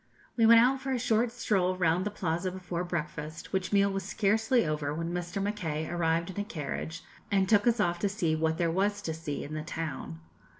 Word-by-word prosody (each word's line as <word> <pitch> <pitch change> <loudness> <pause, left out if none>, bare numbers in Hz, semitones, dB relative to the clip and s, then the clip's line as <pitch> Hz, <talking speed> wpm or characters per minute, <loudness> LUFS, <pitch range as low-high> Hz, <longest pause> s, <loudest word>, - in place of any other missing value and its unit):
We 230 -2 +4
went 230 0 +9
out 260 +3 +3
for 270 - -3
a 260 - +1
short 230 -1 +1
stroll 190 -6 0
round 180 +2 +2
the - - 0
Plaza 180 -2 -2
before 180 -1 -4
breakfast, 155 -2 -5
which 190 -1 -1
meal 200 -1 +4
was 195 0 -2
scarcely 220 +4 +2
over 150 -2 -1
when 165 +1 -3
Mr. 175 +3 -3
Mackay 175 -7 -2
arrived 170 0 0
in 190 - -6
a - - 0
carriage, 165 -3 -5 0.3
and 195 -1 +2
took 205 +2 +4
us 235 -1 +3
off 175 -3 +1
to 200 - +1
see 175 -6 0
what 160 0 0
there 170 -1 +1
was 205 +3 0
to 160 - -2
see 155 -3 -4
in 150 - -7
the 155 - -3
town. 155 - -5
180 Hz, 215 wpm, -29 LUFS, 160-205 Hz, 0.3 s, went